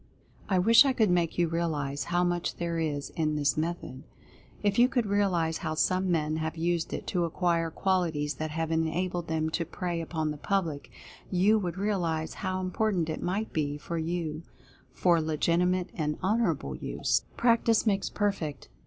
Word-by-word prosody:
I 190 - +3
wish 225 +8 +7
I 275 -2 +2
could 220 -6 +3
make 175 -2 +1
you 175 -1 +3
realize 155 -4 -2
how 175 +1 +1
much 175 -1 -1
there 170 -1 -2
is 145 -3 -2
in 155 -2 -1
this 145 -2 +1
method. 155 -5 -3 0.6
If 205 +1 +2
you 245 +1 +6
could 245 -4 +1
realize 185 -6 +1
how 160 -3 -3
some 185 +3 +1
men 155 -2 +1
have 160 0 -3
used 170 0 0
it - - -4
to 175 -2 0
acquire 170 0 0
qualities 160 -5 0
that 155 +4 -4
have 160 +1 -2
enabled 165 +2 -1
them 160 0 -1
to 170 - 0
prey 175 0 -3
upon 160 -2 -2
the 150 - -6
public, 165 -5 -2 0.4
you 200 +4 +4
would 180 -3 -3
realize 170 -6 -1
how 185 0 -1
important 185 -3 0
it 155 - -5
might 200 +5 -2
be 145 -2 -1
for 165 +3 -4
you 160 -1 -3 0.5
for 170 -3 +3
legitimate 170 +4 +1
and 150 -2 -2
honorable 185 - 0
use. - - -1
PRACTICE 230 -1 +3
MAKES 200 -3 +1
PERFECT. 180 -9 -2
170 Hz, 170 wpm, -28 LUFS, 160-185 Hz, 0.6 s, wish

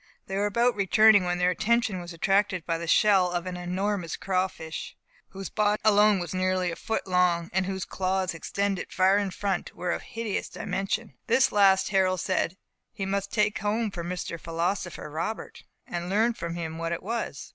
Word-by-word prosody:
They 195 - -5
were 205 +1 +1
about 235 +4 +2
returning, 205 0 +5
when 175 0 0
their 180 0 +3
attention 215 0 +1
was 175 0 -8
attracted 190 0 +1
by 165 -1 -1
the 170 - -5
shell 190 0 +4
of 175 0 -2
an 185 -1 -4
enormous 180 0 -2
crawfish, 185 -4 -3 0.3
whose 195 -1 -7
body 210 -1 +1
alone 210 -1 +5
was 175 -1 -4
nearly 185 -1 0
a - - -5
foot 225 - -3
long, 180 -2 +1
and 190 0 +1
whose 190 -1 -3
claws, 190 -1 -1
extending 195 +3 -2
far 190 +2 +3
in 200 -1 -1
front, 190 0 -3
were 180 -1 -2
of - - -2
hideous 230 -5 -4
dimensions. 200 +3 -3 0.2
This 255 +3 +4
last 195 -2 +4
Harold 185 -2 +2
said 185 0 -1 0.3
he 195 - -4
must 200 0 -2
take 210 -1 +1
home 210 +1 0
for 175 -3 -5
"Mr. 175 -1 -4
Philosopher 170 +2 -3
Robert," 160 +9 -5 0.2
and 175 0 -4
learn 220 +5 +2
from 170 -5 -5
him 165 -1 -5
what 165 0 -2
it 170 - -5
was. 230 +4 -4
190 Hz, 185 wpm, -27 LUFS, 175-205 Hz, 0.3 s, returning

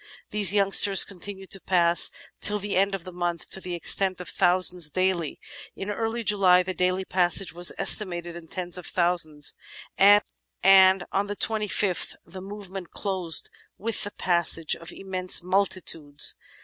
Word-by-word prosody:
These 205 -4 +6
youngsters 200 -1 +5
continued 195 0 -11
to 195 - -7
pass 175 -2 +2 0.3
till 210 0 +2
the 205 0 -5
end 195 +1 +1
of 190 - -8
the 185 - -10
month 175 -1 -5
to 190 - -4
the 180 -1 -5
extent 185 +2 +2
of 180 - -7
thousands 180 -2 +2
daily. 185 -2 -2 0.4
In 200 +2 -6
early 225 +2 -4
July 190 -4 +3
the 185 +1 -5
daily 185 +1 -1
passage 180 -2 -1
was 175 +1 0
estimated 175 -4 +2
in 170 -1 -11
tens 180 +1 -5
of 180 - -9
thousands, 170 -4 0 0.5
and 195 -2 +3
on 200 +1 -1
the 205 - -5
25th 210 -4 -1
the 185 +2 -11
movement 195 -2 -9
closed 185 -5 -2 0.3
with 225 +1 -1
the 205 - -3
passage 170 -4 +1
of 165 - -14
''im - - -11
mense 185 -1 +1
multitudes." 180 -6 -1
185 Hz, 155 wpm, -24 LUFS, 175-195 Hz, 0.5 s, These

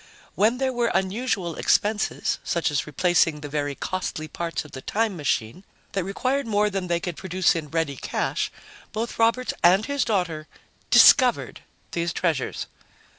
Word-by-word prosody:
When 225 +4 +2
there 260 0 0
were 240 -1 +1
unusual 190 -3 -1
expenses, 210 +1 +1
such 170 -3 0
as 145 - -1
replacing 165 0 +2
the 145 - -6
very 145 -1 -2
costly 170 -3 -4
parts 165 0 -4
of 150 - -13
the 130 - -8
time 215 +5 -1
machine, 145 - -2 0.3
that 195 - -1
required 255 +8 -1
more 210 -1 +2
than 190 -2 -3
they 170 -1 +1
could 175 -1 -4
produce 185 0 +1
in 155 -3 -4
ready 160 -4 -1
cash, - - -2 0.4
both 225 +2 -4
Roberts 230 +3 +2
and 190 +5 +5
his 285 -2 0
daughter 175 -7 -1 0.4
'discovered' - - +5 0.3
these 170 0 -2
treasures." 160 -8 -1
180 Hz, 155 wpm, -24 LUFS, 160-215 Hz, 0.4 s, and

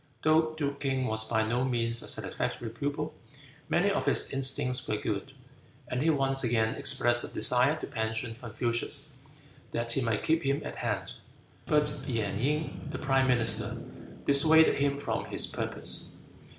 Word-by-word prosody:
Though 155 0 +3
Duke 140 -2 -2
King 135 -2 -1
was 110 -1 0
by 110 0 +1
no 120 +3 0
means 115 -2 0
a - - -7
satisfactory 115 - -3
pupil, 140 +5 -3 0.6
many - - +2
of - - -2
his - - +3
instincts 135 -1 +1
were 105 - 0
good, 105 +6 -4 0.5
and 125 +1 -2
he 160 - +2
once 135 -3 +2
again 110 -2 +1
expressed 130 -4 +3
a - - -3
desire 125 +4 +2
to - - -6
pension 110 +1 -2
Confucius, 120 +4 -1 0.6
that 115 0 -1
he 135 - +2
might 115 -3 -1
keep 160 +1 +2
him 140 +2 -1
at - - -6
hand; - - -2 0.5
but 150 -1 +2
Gan 110 -6 -2
Ying, 150 +5 -2
the - - -5
Prime 135 -2 +1
Minister, 115 -3 +1 0.5
dissuaded 160 +3 +5
him 140 0 +1
from 145 - -3
his - - +3
purpose. - - -1
130 Hz, 160 wpm, -29 LUFS, 115-140 Hz, 0.6 s, dissuaded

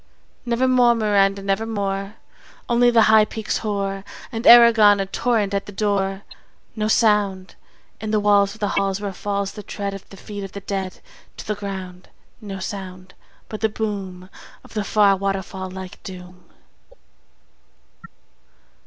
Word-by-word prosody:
Never 240 +2 +1
more; 245 -2 +4
Miranda, 200 -3 +2
Never 200 +3 -1
more. 200 -1 -3 0.5
Only 240 0 +4
the 230 -2 +5
high 215 0 +6
peaks 215 0 -3
hoar; 195 -2 -3 0.3
And 225 -1 -3
Aragon 225 -4 +8
a 195 - 0
torrent 210 0 0
at 200 - -2
the - - -7
door. 195 -1 -1 0.5
No 215 -1 -1
sound 205 -4 +1 0.5
In 220 - -5
the 215 0 +2
walls 205 -1 +3
of - - -17
the 205 - 0
halls 195 -1 0
where 200 -1 -4
falls 200 0 -3
The 210 - -9
tread 200 0 -5
Of 195 - -10
the 195 - -13
feet 205 +1 -8
of 195 - -8
the 200 - -7
dead 195 -1 -5 0.4
to - - -8
the 210 - -1
ground, 190 -3 -7 0.3
No 200 -2 -6
sound: 185 -1 -7 0.3
But 215 - -7
the 220 - +2
boom 195 -4 -5 0.3
Of - - -16
the 210 -2 -1
far 200 -1 +4
waterfall 190 -1 -4
like 185 0 -9
doom. 180 -1 -11
200 Hz, 155 wpm, -21 LUFS, 195-215 Hz, 0.5 s, Aragon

